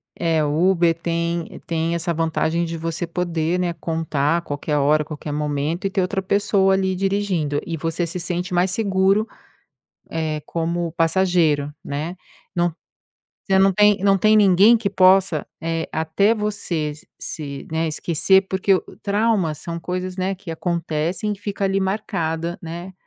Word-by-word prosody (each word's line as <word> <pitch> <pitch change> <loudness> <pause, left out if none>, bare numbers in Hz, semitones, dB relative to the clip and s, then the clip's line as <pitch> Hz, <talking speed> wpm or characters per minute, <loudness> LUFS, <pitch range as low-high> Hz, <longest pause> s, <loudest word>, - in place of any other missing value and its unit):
É, 165 -2 +1
o 155 +5 +2
Uber 170 -3 +3
tem 170 0 -3
tem 165 0 -1
essa 170 +1 -1
vantagem 165 +1 0
de 165 0 -4
você 165 +1 -3
poder, 170 0 -1
né, 175 -1 0
contar 160 -2 -1
a - - -2
qualquer 150 -1 -2
hora, 150 +2 +3
qualquer 150 0 -7
momento 150 +4 -2
e - - -2
ter 190 - 0
outra 195 +1 -1
pessoa 195 0 +2
ali 190 -1 0
dirigindo, 190 -6 0
e 165 - -3
você 165 +2 -2
se 170 +2 -4
sente 180 +1 -3
mais 180 +2 +2
seguro, 195 +1 +2 0.8
eh, 155 -2 -2
como 170 +1 -2
passageiro, 165 -4 +2
né. 155 +6 -4 0.4
Não 175 -2 +1 0.7
você 190 -1 +3
não 195 0 +5
tem 205 +1 +4
não 195 -1 +4
tem 215 +3 +4
ninguém 205 +3 +6
que 220 -3 -1
possa 185 -4 +4 0.2
eh, 165 0 -2
até 160 +7 +2
você 200 -8 -2 0.3
se 140 -3 -6
né, 160 0 0
esquecer, 170 +5 +3
porque 190 +1 +1
o - - 0
o - - -14
trauma 205 -4 +1
são 170 +3 -6
coisas, 180 +1 -4
né, 190 +1 -1
que 195 -2 -15
acontecem 170 +3 -2
e 205 - -7
fica 205 0 -3
ali 195 0 +1
marcada, 170 -4 -2
né, 170 +3 -7
170 Hz, 160 wpm, -21 LUFS, 160-190 Hz, 0.8 s, ninguém